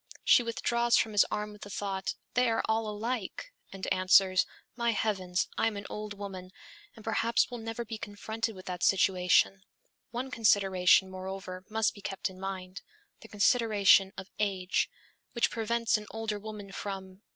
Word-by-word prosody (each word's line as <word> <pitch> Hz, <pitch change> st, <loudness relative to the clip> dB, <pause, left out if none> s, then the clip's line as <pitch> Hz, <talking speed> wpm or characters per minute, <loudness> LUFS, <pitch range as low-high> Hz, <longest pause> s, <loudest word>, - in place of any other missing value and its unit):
She -, -, +6 dB
withdraws 235 Hz, 0 st, +1 dB
from 220 Hz, -, +1 dB
his 205 Hz, -2 st, +4 dB
arm 210 Hz, 0 st, -3 dB
with 210 Hz, -, -14 dB
the 205 Hz, -, -8 dB
thought, 195 Hz, -1 st, -3 dB, 0.2 s
'They 250 Hz, -1 st, +3 dB
are 225 Hz, -, +1 dB
all 220 Hz, 0 st, 0 dB
alike!' 230 Hz, -, -4 dB, 0.2 s
and 195 Hz, -1 st, -6 dB
answers, 185 Hz, 0 st, +4 dB, 0.3 s
'My 235 Hz, -1 st, +1 dB
heavens, 185 Hz, -5 st, 0 dB
I -, -, +3 dB
am 215 Hz, -2 st, -2 dB
an 200 Hz, -, -7 dB
old 210 Hz, 0 st, -5 dB
woman, 190 Hz, -2 st, -7 dB, 0.5 s
and 220 Hz, -, -14 dB
perhaps 230 Hz, +2 st, +1 dB
will 245 Hz, -, -5 dB
never 225 Hz, +1 st, -5 dB
be 225 Hz, -1 st, -6 dB
confronted 220 Hz, +2 st, -4 dB
with 185 Hz, -, -11 dB
that 180 Hz, -1 st, -5 dB
situation; 190 Hz, 0 st, +3 dB, 0.5 s
one 255 Hz, +2 st, -4 dB
consideration, 195 Hz, -4 st, +4 dB
moreover, 185 Hz, 0 st, -7 dB
must 220 Hz, 0 st, +1 dB
be 205 Hz, -, -13 dB
kept 195 Hz, 0 st, -3 dB
in 185 Hz, -, -14 dB
mind: 190 Hz, 0 st, -6 dB, 0.4 s
the 225 Hz, -, -13 dB
consideration 205 Hz, -3 st, +4 dB
of 190 Hz, 0 st, -8 dB
age, 190 Hz, -3 st, 0 dB, 0.4 s
which 235 Hz, -, +2 dB
prevents 230 Hz, 0 st, +1 dB
an 210 Hz, -, -11 dB
older 220 Hz, -2 st, -3 dB
woman 210 Hz, -2 st, -8 dB
from 190 Hz, -1 st, -6 dB
205 Hz, 165 wpm, -30 LUFS, 190-225 Hz, 0.5 s, She